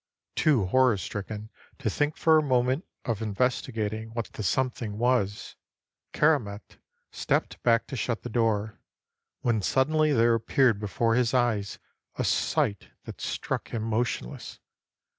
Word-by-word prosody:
Too 135 -11 +3
horror 125 +2 +3
stricken 105 +3 -6 0.3
to 135 - -4
think 145 +7 0
for 160 -1 +5
a - - +2
moment 130 +2 +1 0.2
of 115 -3 -2
investigating 110 -1 -1
what 115 -2 -4
the - - -6
Something 110 +1 -1
was, 115 -4 0 0.6
Keramet 115 -10 0 0.3
stepped - - -1
back 115 -1 +3
to - - -6
shut 115 -1 -2
the - - -4
door, 110 -2 0 0.6
when 115 -3 +1
suddenly 155 +7 +2
there 115 -3 +4
appeared 115 0 +2
before 115 +2 0
his 125 +1 +2
eyes 110 -5 +1 0.4
a - - -1
sight 100 - 0 0.2
that - - -9
struck - - -3
him 115 -2 -2
motionless. 115 - -3
115 Hz, 135 wpm, -27 LUFS, 105-130 Hz, 0.6 s, for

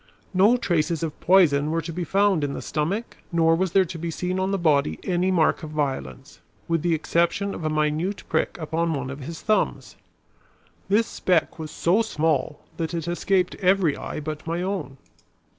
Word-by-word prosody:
No 205 +7 +5
traces 170 -6 0
of 155 -2 -4
poison 155 -6 +4
were 165 +1 0
to 165 +1 -6
be, 175 +2 -3
found 195 -3 +2
in 140 -1 -1
the - - -5
stomach 180 +10 -2
nor 165 -1 +4
was 185 0 -1
there 195 -1 +5
to 170 -1 -7
be 170 +1 -3
seen 180 +3 -2
on 190 +1 0
the 195 - 0
body 140 - +2
any 180 +1 +1
mark 175 -4 +2
of 155 - -7
violence, 135 - -4 0.3
with 165 -1 +1
the 170 0 +2
exception 170 +5 0
of - - -7
a 155 - 0
minute 155 +5 -1
prick - - 0
upon 165 0 -1
one 135 -1 -4
of 140 - -7
his 160 +4 -8
thumbs. 215 -1 0 0.9
This 215 +3 +4
speck 180 -5 0
was 155 -1 -5
so 180 +8 +2
small 155 -7 -1 0.2
that 165 0 -3
it 165 -1 -3
escaped 180 +1 +1
every 185 -5 +3
eye - - -5
but 155 +1 -6
my 170 +2 -1
own. 185 -8 -4
165 Hz, 190 wpm, -24 LUFS, 155-185 Hz, 0.9 s, No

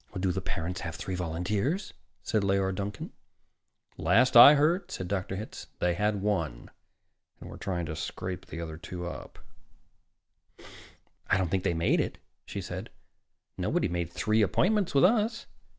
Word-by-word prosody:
"Do 95 0 +1
the 95 +2 -2
parents 90 0 -3
have 80 -2 -5
three 95 - -5
volunteers?" 100 - -2 0.3
said 110 -2 +1
Leora 95 -1 +1
Duncan. 100 +1 -5 0.8
"Last 115 +11 +3
I 130 +5 +11
heard," 170 +6 +2
said 95 - -5
Dr. 95 0 -2
Hitz, 105 +3 -7
"they 90 0 +1
had 105 +2 0
one, 85 -12 -2 0.7
and - - -10
were - - -9
trying 90 -4 -3
to 80 - -5
scrape 90 +3 -5
another 80 -1 -6
two 90 +1 -7
up." 85 - -8 1.9
"I 95 - +3
don't 95 -3 0
think 95 -1 0
they 85 - +1
made 80 - +2
it," - - -4 0.3
she - - -5
said. - - -6 0.7
"Nobody - - +1
made 85 -1 -3
three 110 +5 +1
appointments 190 - +2
with 135 - +5
us. 220 +3 +2
95 Hz, 150 wpm, -29 LUFS, 85-110 Hz, 1.9 s, I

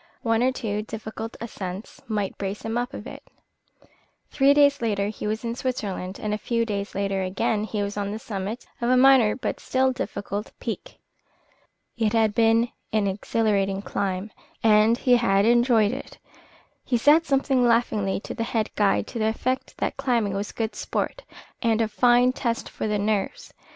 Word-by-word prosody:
One 225 -1 +2
or 255 +1 +3
two 215 -5 -3
difficult 220 +1 -7
ascents 195 -3 -7
might 205 -3 -2
brace 200 +1 -4
him 225 0 -3
up 245 +1 -1
a - - -6
bit. - - -9 1.1
Three 275 0 +4
days 285 -2 +4
later 205 -3 0
he 210 - -5
was 215 +2 -2
in 230 0 -2
Switzerland, 205 -7 -3
and 210 -1 -2
a 210 - -2
few 230 0 0
days 200 -2 -4
later 195 -1 -1
again 205 +3 0
he 210 -2 -2
was 200 +1 -4
on 200 -1 -2
the 215 - -3
summit 210 +1 -5 0.2
of 235 - +1
a 255 - +5
minor 255 -4 +6
but 255 - -3
still 260 0 +1
difficult 205 -4 -5
peak. - - -6 1.0
It 220 -1 +1
had 220 -2 +3
been 230 +1 +3 0.2
an 215 -2 +1
exhilarating 200 0 0
climb, 195 +1 -3 0.3
and 220 +1 +5
he 250 -1 +4
had 200 -4 +3
enjoyed 235 -2 +4
it. 265 +3 -7 0.7
He 245 - +1
said 305 +7 +5
something 270 -2 +2
laughingly 230 -5 +2
to - - -6
the - - -5
head 225 -2 -1
guide 205 -2 +2
to 235 - -6
the 220 - +2
effect 255 +4 -2
that - - -2
climbing 230 -6 0
was 200 +1 -3
good 225 -1 -3
sport - - -3 0.4
and 230 -2 +2
a 225 - +2
fine 245 +3 +4
test 235 -3 -2
for - - -4
the 210 0 0
nerves. 205 -1 -2
220 Hz, 175 wpm, -25 LUFS, 205-240 Hz, 1.1 s, minor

